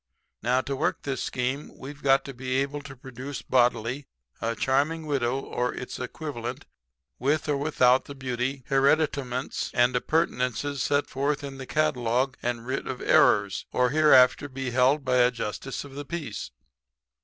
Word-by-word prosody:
Now, 125 +3 +2
to 135 +1 -3
work 140 - -1
this 135 -2 -3
scheme 130 +3 -3
we've 140 +2 -9
got 135 0 +3
to 135 - -7
be 130 +1 -3
able 140 +2 -1
to 140 -1 -10
produce 130 +2 -8
bodily 125 +1 +1 0.3
a 115 0 -1
charming 145 +7 +1
widow 135 -3 0
or 125 -2 -2
its 125 - -6
equivalent 125 -1 -5 0.5
with 145 +5 +1
or 145 - +1
without 130 -3 +3
the 140 - -9
beauty, 130 0 -3
hereditaments 135 -2 +1
and 125 0 +3
appurtenances 140 -1 0
set 145 +2 +1
forth 145 +2 -1
in 135 -1 -7
the 130 - -7
catalogue 130 -3 +1
and 120 -1 -2
writ 130 +2 -3
of 130 -1 -4
errors, 100 -2 +3
or 125 0 +2
hereafter 145 -2 +5
be 135 -1 -4
held 130 +4 +3
by 130 0 +2
a 125 0 +5
justice 125 +2 -5
of 140 -1 -12
the 145 +1 -5
peace.' 140 - -5
130 Hz, 160 wpm, -26 LUFS, 125-140 Hz, 0.5 s, hereafter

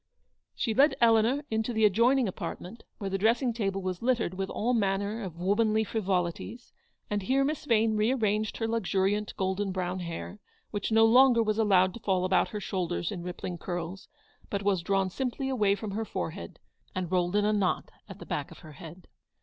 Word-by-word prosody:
She 225 - -1
led 280 +6 +4
Eleanor 230 +4 +4
into 220 +2 -1
the 220 -1 +3
adjoining 235 +5 +3
apartment, 190 +3 -6 0.2
where 195 -3 -4
the 195 - -1
dressing 235 +4 +2
table 195 -4 -2
was 185 -1 -3
littered 235 -6 +1
with 190 +1 -3
all 240 +3 -1
manner 205 0 0
of 180 -5 -7
womanly 215 +4 +2
frivolities, 195 +2 -3 0.3
and 205 -1 -1
here 265 +7 +2
Miss 300 +1 -3
Yane 225 -1 +3
re 215 +3 +2
arranged 215 -4 0
her 225 - -1
luxuriant 210 -1 0
golden 190 +1 -1
brown 185 0 -2
hair, 175 +4 -6 0.3
which 205 +1 -3
no 225 0 +6
longer 245 0 +6
was 215 0 -1
allowed 185 -4 +4
to 235 - -8
fall 185 -4 0
about 185 0 +2
her 210 +3 -5
shoulders 180 -3 -2
in 185 -4 -5
rippling 175 0 -6
curls, 175 +1 -5 0.4
but 200 0 -2
was 195 -3 +1
drawn 190 +1 0
simply 265 +4 -3
away 210 -6 +2
from 205 0 -6
her 220 +3 -2
forehead, - - -5 0.4
and 185 -2 -3
rolled 180 0 +1
in 205 0 +3
a 215 - +2
knot 200 -3 0 0.2
at - - -9
the - - -10
back - - -3
of - - -13
her 155 - -10
head. 170 +2 -12
205 Hz, 190 wpm, -28 LUFS, 185-225 Hz, 0.4 s, no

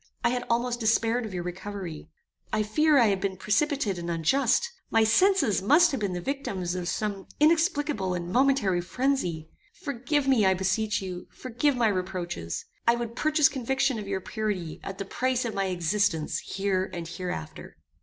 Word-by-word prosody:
I - - +4
had 245 0 -2
almost 240 +1 0
despaired 225 +1 +1
of 200 - -9
your 175 - -3
recovery. 180 -3 -6 0.4
I 215 0 +1
fear 305 +8 +3
I 235 -4 +5
have 195 -1 0
been 195 -2 -2
precipitate 215 - 0
and 170 0 -5
unjust. 235 - +2 0.2
My 225 - +4
senses 230 - +3
must 310 - +5
have 270 - -2
been 200 -3 -1
the 175 - -3
victims 190 -8 -3
of 180 -1 -3
some 200 0 -3
inexplicable 300 - +2
and 175 0 -4
momentary 250 -8 +3
phrenzy. 180 - -1 0.3
Forgive 280 +1 -1
me, 260 -5 +4
I 190 -1 +4
beseech 195 +3 0
you, 180 -1 -6
forgive 255 +3 -1
my 235 -2 +3
reproaches. 180 - -3 0.2
I 235 - +6
would 235 -1 -5
purchase 305 0 +4
conviction 265 -1 0
of 205 - -7
your 195 -1 -2
purity, 200 -7 -3
at 195 - -6
the 195 - -4
price 255 +4 -1
of 230 - -3
my 195 0 0
existence 180 -2 0
here 195 -1 -1
and 170 -1 -5
hereafter." 175 - -6
210 Hz, 175 wpm, -27 LUFS, 185-260 Hz, 0.4 s, I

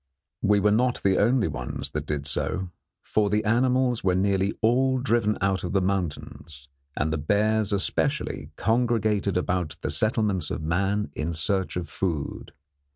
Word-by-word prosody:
We 105 0 +3
were 105 +1 +3
not 125 +3 +1
the 95 -1 +3
only 115 +2 +3
ones - - -5
that - - -4
did 75 -1 -2
so, 90 +5 -2 0.3
for 105 -1 +1
the 105 +1 0
animals 125 +2 +2
were 90 -1 +2
nearly 95 +1 +1
all 130 +4 +3
driven 115 -4 +1
out 95 -1 +1
of 90 - -3
the 100 - +4
mountains, 80 -6 -4 0.3
and 80 +2 0
the 80 - -1
bears, 105 +6 +1
especially, 100 -2 -1
congregated 110 -3 +1
about 90 -4 -1
the - - -2
settlements 110 -4 0
of - - -4
man 95 +6 0
in 80 +2 -3
search 95 +4 -1
of 85 -2 -4
food. 80 -3 -3
100 Hz, 160 wpm, -25 LUFS, 90-110 Hz, 0.3 s, the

